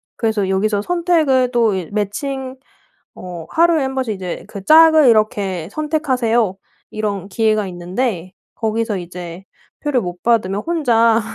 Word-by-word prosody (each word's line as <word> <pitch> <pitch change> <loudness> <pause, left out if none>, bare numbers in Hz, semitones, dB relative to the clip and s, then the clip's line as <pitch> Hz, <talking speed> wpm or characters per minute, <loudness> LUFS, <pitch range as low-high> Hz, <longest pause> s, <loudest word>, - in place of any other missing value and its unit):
그래서 215 -4 -1
여기서 200 +2 +1
선택을 315 -5 +1
또 230 -4 +2
이 180 -3 -5
매칭 255 +6 -3 0.6
어 175 -3 -8
하루에 335 -2 +3
1 265 0 -3
번씩 255 -5 -2
이제 185 -2 -6
그 200 - -9
"짝을 315 +2 +7
이렇게 200 -6 +1
선택하세요." 250 - 0 0.3
이런 205 -3 -3
기회가 215 -1 +1
있는데 185 +1 -3 0.2
거기서 220 -1 -1
이제 175 0 -8 0.4
표를 290 -5 0
못 175 -2 -7
받으면 210 -4 +1
혼자 230 -9 +2
220 Hz, 280 characters per minute, -18 LUFS, 190-265 Hz, 0.6 s, 짝을